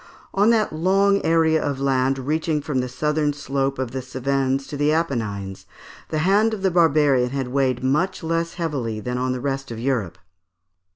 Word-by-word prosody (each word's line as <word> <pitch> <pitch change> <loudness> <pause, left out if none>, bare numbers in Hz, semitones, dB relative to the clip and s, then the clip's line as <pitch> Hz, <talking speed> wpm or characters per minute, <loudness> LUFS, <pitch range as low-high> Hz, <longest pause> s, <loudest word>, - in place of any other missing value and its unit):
On 205 +3 +3
that 220 -6 +2
long 195 +5 +2
area 160 -1 +3
of 140 -2 -2
land 135 -1 +1
reaching 155 +3 -1
from 145 -2 -2
the 125 0 -2
southern 150 +3 0
slope 135 -1 -2
of 130 -2 -3
the 130 - -4
Cevennes 135 +1 -1
to 135 - -7
the 145 +1 +2
Apennines, 110 - -2 0.4
the 155 - -2
hand 215 +4 +3
of 195 - -9
the 190 - +2
barbarian 150 -7 +3
had 135 -1 -3
weighed 130 -2 0
much 150 +8 0
less 165 +1 -1
heavily 135 -11 -3
than 125 +3 -3
on 130 0 0
the 130 - -2
rest 135 +1 -3
of 115 - -6
Europe. 115 -9 -1
140 Hz, 180 wpm, -22 LUFS, 130-160 Hz, 0.4 s, On